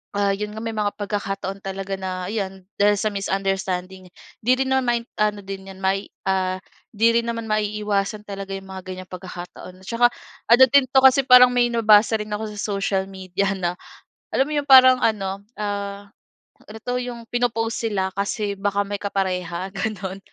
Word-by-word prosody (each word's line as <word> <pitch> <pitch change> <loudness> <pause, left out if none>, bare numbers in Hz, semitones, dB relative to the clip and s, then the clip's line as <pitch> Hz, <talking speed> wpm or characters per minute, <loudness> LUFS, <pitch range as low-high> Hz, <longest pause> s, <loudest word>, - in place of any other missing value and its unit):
ah, 200 -1 +2
'yon 210 +1 -4
nga 220 - -7
may 225 -1 -3
mga 210 -1 +1
pagkakataon 195 -1 -4
talaga 195 0 -5
na 185 -1 -4
'yan 195 -3 -4
dahil 205 +1 +4
sa 215 - +1
misunderstanding 190 -1 -2 0.3
'di 245 - +3
rin - - -3
naman- 240 -3 +1 0.2
ano 210 -1 +1
din 195 0 -7
'yan 190 - -13
may 195 +1 0 0.2
ah, 185 -1 +1 0.4
'di 230 +2 +3
rin 235 - -8
naman 230 -1 -3
maiiwasan 210 -1 -1
talaga 195 -1 -6
'yong 195 - -11
mga 190 -1 -7
ganyang 185 0 -7
pagkakataon. 180 0 -9
Tsaka 240 +2 +3 0.4
ano 240 +3 +8
din 280 -1 +6
'to, 265 - +1
kasi 265 +1 +7
parang 250 -1 +8
may 245 -1 +3
nabasa 220 -1 +5
rin 210 0 -7
ako 215 +1 -3
sa - - -6
social 195 -1 0
media 190 +1 -2
na, 180 -1 -2 0.6
alam 270 - +3
mo - - -3
'yong 290 -1 -1
parang 255 -1 +8
ano, 200 -3 0 0.2
ah, 200 -1 -4 0.6
ano 215 +1 -10
'to, 250 0 -1
'yong 245 -1 -6
pino-post 230 -2 -1
sila. 190 -3 -1
Kasi 200 +1 -2
baka 200 0 0
may 205 0 -4
kapareha 185 -2 -2
gano'n. 195 -1 -4
200 Hz, 175 wpm, -22 LUFS, 190-225 Hz, 0.6 s, ano